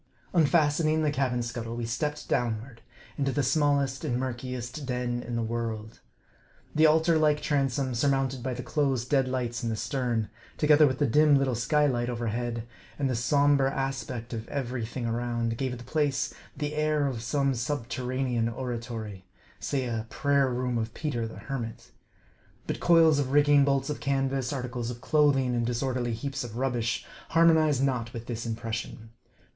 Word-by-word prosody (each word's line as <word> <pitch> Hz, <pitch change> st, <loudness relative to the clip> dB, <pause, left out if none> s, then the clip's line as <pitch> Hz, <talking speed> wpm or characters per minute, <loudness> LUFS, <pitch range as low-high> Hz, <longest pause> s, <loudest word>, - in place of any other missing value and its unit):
Unfastening 155 Hz, -1 st, +3 dB
the 150 Hz, -, +2 dB
cabin 130 Hz, -4 st, 0 dB
scuttle, 115 Hz, 0 st, -5 dB
we 120 Hz, -1 st, -3 dB
stepped 150 Hz, +6 st, -3 dB
downward 115 Hz, 0 st, -2 dB, 0.4 s
into 135 Hz, -1 st, +1 dB
the 145 Hz, +1 st, 0 dB
smallest 140 Hz, -1 st, +1 dB
and 120 Hz, -, 0 dB
murkiest 125 Hz, +1 st, -4 dB
den 125 Hz, -1 st, -1 dB
in 120 Hz, -1 st, -5 dB
the 115 Hz, -, 0 dB
world. 110 Hz, -1 st, -4 dB, 0.7 s
The 155 Hz, +1 st, +5 dB
altar 160 Hz, +1 st, +4 dB
like 150 Hz, -1 st, +3 dB
transom, 135 Hz, -3 st, 0 dB
surmounted 135 Hz, +1 st, +1 dB
by 130 Hz, 0 st, -3 dB
the 125 Hz, -, -5 dB
closed 135 Hz, -4 st, 0 dB
dead 135 Hz, -2 st, +3 dB
lights 125 Hz, -2 st, -2 dB
in 115 Hz, -, -2 dB
the 110 Hz, -, -1 dB
stern, 120 Hz, -3 st, -1 dB, 0.3 s
together 150 Hz, 0 st, +6 dB
with 130 Hz, -1 st, -1 dB
the 145 Hz, -, +2 dB
dim 150 Hz, +3 st, +5 dB
little 135 Hz, -2 st, +1 dB
sky 135 Hz, +6 st, +2 dB
light 120 Hz, -3 st, 0 dB
overhead, 120 Hz, 0 st, -2 dB, 0.3 s
and 135 Hz, -2 st, 0 dB
the -, -, 0 dB
som 145 Hz, +4 st, +3 dB
ber 135 Hz, -1 st, +2 dB
aspect 135 Hz, -3 st, -3 dB
of 115 Hz, -1 st, -5 dB
every 125 Hz, -4 st, -3 dB
thing 120 Hz, +1 st, -5 dB
around, 115 Hz, 0 st, -1 dB
gave 125 Hz, 0 st, -2 dB
the 120 Hz, -, -10 dB
place 145 Hz, 0 st, 0 dB, 0.2 s
the 150 Hz, 0 st, -2 dB
air 150 Hz, -1 st, +1 dB
of 125 Hz, -5 st, -2 dB
some* 135 Hz, +3 st, +1 dB
subterranean 125 Hz, -2 st, -1 dB
oratory, 115 Hz, -5 st, -5 dB, 0.3 s
say 135 Hz, -2 st, -1 dB
a 115 Hz, -2 st, -3 dB
Prayer 140 Hz, -2 st, +2 dB
Room 125 Hz, -1 st, -1 dB
of 110 Hz, 0 st, -4 dB
Peter 120 Hz, -7 st, -2 dB
the 110 Hz, -, -10 dB
Hermit. 120 Hz, -5 st, -6 dB, 0.7 s
But -, -, -3 dB
coils 165 Hz, -3 st, +5 dB
of 135 Hz, -2 st, -1 dB
rigging, 145 Hz, -1 st, +6 dB
bolts 140 Hz, 0 st, +1 dB
of 150 Hz, -, -4 dB
canvas, 135 Hz, -2 st, 0 dB
articles 125 Hz, -3 st, -3 dB
of 120 Hz, -1 st, -6 dB
clothing, 135 Hz, -3 st, +3 dB
and 120 Hz, -1 st, +1 dB
disorderly 120 Hz, 0 st, -1 dB
heaps 135 Hz, +3 st, -4 dB
of 115 Hz, -1 st, -7 dB
rubbish, 120 Hz, -3 st, -1 dB, 0.2 s
harmonized 160 Hz, -4 st, +4 dB
not 125 Hz, -4 st, -1 dB
with 115 Hz, 0 st, -6 dB
this 120 Hz, -1 st, -4 dB
impression. 115 Hz, 0 st, -5 dB
130 Hz, 170 wpm, -28 LUFS, 120-145 Hz, 0.7 s, together